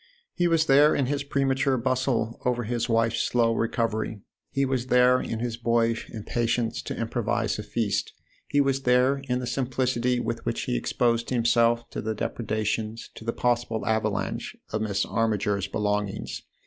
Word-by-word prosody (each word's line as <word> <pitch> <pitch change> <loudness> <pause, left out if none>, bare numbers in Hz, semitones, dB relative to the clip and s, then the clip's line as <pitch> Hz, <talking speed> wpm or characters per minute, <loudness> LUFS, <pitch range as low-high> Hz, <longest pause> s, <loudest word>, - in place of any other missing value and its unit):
He 175 - +1
was 165 -2 +3
there 145 +2 +6
in 140 - +1
his 140 +2 -1
premature 135 -1 +1
bustle 125 -2 0
over 125 -1 0
his 120 +2 -2
wife's 115 0 +2
slow 115 -1 +2
recovery; 115 -2 -1 0.3
he 135 0 +1
was 130 -2 -1
there 125 0 +5
in 115 - -3
his 120 -1 -2
boyish 115 -1 +1
impatience 115 +1 -1
to - - -5
improvise - - -1
a - - -4
feast; - - -1 0.3
he 145 - +1
was 135 -1 +2
there 125 +2 +3
in 125 - +2
the 125 - -3
simplicity 125 -1 0
with 115 -1 -3
which - - -2
he - - -1
exposed 115 - 0
himself 115 -1 +2
to - - -4
the 110 0 -2
depredations, 110 0 -2
to - - -11
the 115 - -1
possible 120 -2 0
avalanche, 110 -1 -1 0.2
of 110 - -1
Miss 100 -2 0
Armiger's 105 -3 0
belong 105 0 0
ings. - - -6
120 Hz, 165 wpm, -26 LUFS, 110-130 Hz, 0.3 s, there